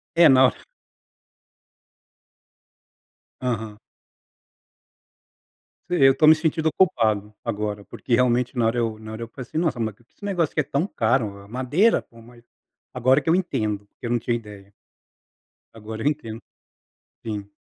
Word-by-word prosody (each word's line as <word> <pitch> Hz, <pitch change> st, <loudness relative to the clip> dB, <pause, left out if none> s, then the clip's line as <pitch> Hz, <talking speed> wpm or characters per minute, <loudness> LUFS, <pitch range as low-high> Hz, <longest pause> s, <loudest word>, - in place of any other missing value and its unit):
É, 170 Hz, -1 st, +7 dB
na 130 Hz, -1 st, +6 dB
hora -, -, -1 dB, 2.8 s
Aham. 110 Hz, -4 st, -3 dB, 2.1 s
E 180 Hz, -, -1 dB
eu 135 Hz, 0 st, +6 dB
tô 155 Hz, -, +4 dB
me 155 Hz, -, +9 dB
sentido 160 Hz, 0 st, 0 dB
ocupado, 110 Hz, -, +1 dB
agora. 105 Hz, 0 st, -3 dB
Porque, 120 Hz, -, -3 dB
realmente 125 Hz, +1 st, +2 dB
na 115 Hz, -, +2 dB
hora 115 Hz, +2 st, 0 dB
eu 115 Hz, -2 st, -1 dB
na 110 Hz, 0 st, -9 dB
hora 110 Hz, -, -7 dB
eu 115 Hz, -, -6 dB
falei 130 Hz, +3 st, -9 dB
assim: -, -, -3 dB
"Nossa, 160 Hz, -6 st, 0 dB
porque, 110 Hz, 0 st, -4 dB
esse 205 Hz, -, -15 dB
negócio 175 Hz, -6 st, 0 dB
aqui -, -, +1 dB
é -, -, +2 dB
tão 140 Hz, +6 st, -1 dB
caro?" 110 Hz, -, 0 dB
é -, -, -17 dB
madeira, 130 Hz, -, +2 dB
pô. 115 Hz, -, -18 dB
Mas, 120 Hz, +1 st, -17 dB, 0.5 s
agora 130 Hz, +4 st, +3 dB
que 140 Hz, -, -6 dB
eu -, -, +5 dB
entendo, 105 Hz, -, -1 dB
que -, -, -7 dB
eu -, -, -3 dB
não 120 Hz, -, +2 dB
tinha 120 Hz, +1 st, -1 dB
ideia. 105 Hz, -3 st, -11 dB, 1.0 s
Agora 110 Hz, 0 st, -8 dB
eu -, -, +3 dB
entendo. 115 Hz, -7 st, -6 dB, 0.8 s
Sim. 105 Hz, -3 st, -5 dB
120 Hz, 155 wpm, -23 LUFS, 110-145 Hz, 2.8 s, me